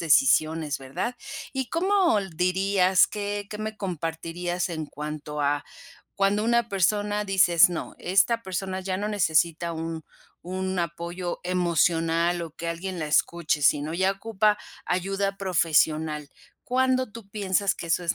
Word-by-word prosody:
decisiones, 155 0 +3
¿verdad? 135 - -4 0.4
¿Y 265 -2 -2
cómo 370 - +3
l 195 -2 -4
dirías? 185 +1 +3
¿Qué 205 -1 -4
qué 210 - -7
me 215 0 -4
compartirías? 175 -1 -3
En 160 -3 -4
cuanto 150 0 -6
a 145 0 +1 0.5
cuando 200 +1 +2
una 235 0 +2
persona, 205 +2 +1
dices: 180 -3 +5
"No, 170 - -5
esta 200 +6 +2
persona 190 0 -3
ya 185 0 -2
no 205 +2 -2
necesita 170 -3 +1
un 165 0 -4 0.4
un 185 +1 -3
apoyo 170 +1 -3
emocional 170 -1 +1
o 165 - -6
que 165 +2 -6
alguien 180 +2 -4
la 155 - -2
escuche, 155 0 +1
sino 150 +2 +2
ya 190 +2 +2
ocupa 210 +1 +1 0.3
ayuda 195 +2 -1
profesional" 155 -5 +1 0.4
¿Cuándo 255 -3 +1
tú 225 -4 -11
piensas 200 -1 0
que 170 - -7
eso 165 +2 +1
es 165 - +1
180 Hz, 140 wpm, -26 LUFS, 165-200 Hz, 0.5 s, dices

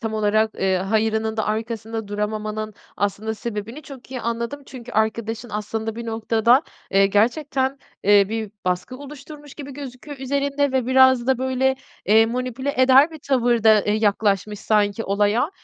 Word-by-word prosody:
tam 220 -1 -3
olarak, 215 +1 +2
eee, 190 -1 +1
hayırının 220 +3 0
da 220 - 0
arkasında 225 0 -4
duramamanın 215 0 -3 0.2
aslında 205 +2 -2
sebebini 225 +6 -6
çok 270 -3 -12
iyi 255 -2 -4
anladım. 235 +5 -3
Çünkü 250 -2 -10
arkadaşın 220 +2 -1
aslında 220 +1 -3
bir 235 0 -6
noktada, 225 +4 +2 0.3
eee, 195 0 +4
gerçekten, 265 +6 +1 0.3
eee, 200 -1 +6
bir 220 -2 -3
baskı 180 +7 -2
oluşturmuş 290 +1 -11
gibi 280 -2 -8
gözüküyor 275 +1 -9
üzerinde 280 +1 0
ve 260 -2 0
biraz 260 -1 +5
da 265 -2 +2
böyle, 260 0 +1 0.3
eee, 220 +2 +5
manipüle 255 +3 -3
eder 265 +4 +6
bir 315 - -10
tavırda, 235 -5 +3
eee, 210 - -1
yaklaşmış 210 -1 +1
sanki 210 0 +1
olaya. 205 - +1
225 Hz, 150 wpm, -22 LUFS, 215-260 Hz, 0.3 s, eee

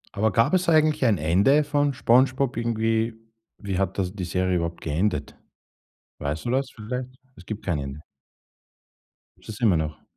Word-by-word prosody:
Aber 110 +1 +2
gab 115 - +2
es 180 -2 +2
eigentlich 155 -2 +3
ein 105 -5 +3
Ende 100 - +3
von 145 -1 +1
Spongebob 130 +1 +2
irgendwie? 115 -1 0 0.4
Wie 100 -3 -3
hat 95 0 -1
das 95 0 -1
die 95 -4 -4
Serie 90 +1 0
überhaupt 85 0 -3
geendet? 85 +7 -1 0.8
Weißt 75 +7 -4
du 120 - -1
was 135 0 0
vielleicht? 125 +3 -5 0.3
Es 90 - -14
gibt 110 -1 -6
kein 85 -6 0
Ende. 70 +2 -6 1.4
Gibt - - -18
es 105 - -7
immer 100 -8 +4
noch? 75 -1 -4
110 Hz, 165 wpm, -24 LUFS, 90-130 Hz, 1.4 s, immer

